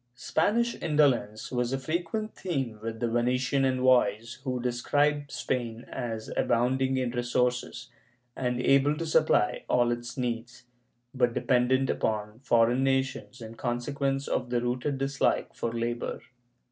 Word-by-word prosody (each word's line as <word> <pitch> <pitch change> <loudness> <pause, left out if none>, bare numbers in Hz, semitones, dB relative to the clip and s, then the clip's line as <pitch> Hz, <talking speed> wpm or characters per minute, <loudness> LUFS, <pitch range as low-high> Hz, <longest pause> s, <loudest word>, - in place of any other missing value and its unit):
^ - - -46
Spanish 230 - +1
indolence 135 -9 +1
was 125 -1 0
a 135 - 0
frequent 175 +10 -3
theme 135 - -3
with 115 0 -5
the 120 - 0
Venetian 125 +3 +1
envoys 125 -3 +2
who 130 -2 -2
describe 145 +4 +1
Spain 120 -1 -3
as 115 -4 -4
abounding 130 +2 +1
in 125 -2 0
resources, 125 +1 -1 0.4
and 125 -1 -1
able 140 +3 +3
to 165 - -3
supply 155 -9 +2
all 120 -1 +3
its 120 +1 -5
needs, 120 -1 -4 0.5
but 125 -3 +1
dependent 130 +1 +2
upon 105 -1 -2
foreign 120 -1 +3
nations 135 -1 -1
in 110 0 -8
consequence 135 +4 -2
of 125 - -1
the 120 -1 +1
rooted 125 +4 -1
dislike 135 0 0
for 115 - -3
labor. 120 +1 -3
125 Hz, 135 wpm, -28 LUFS, 120-135 Hz, 0.5 s, able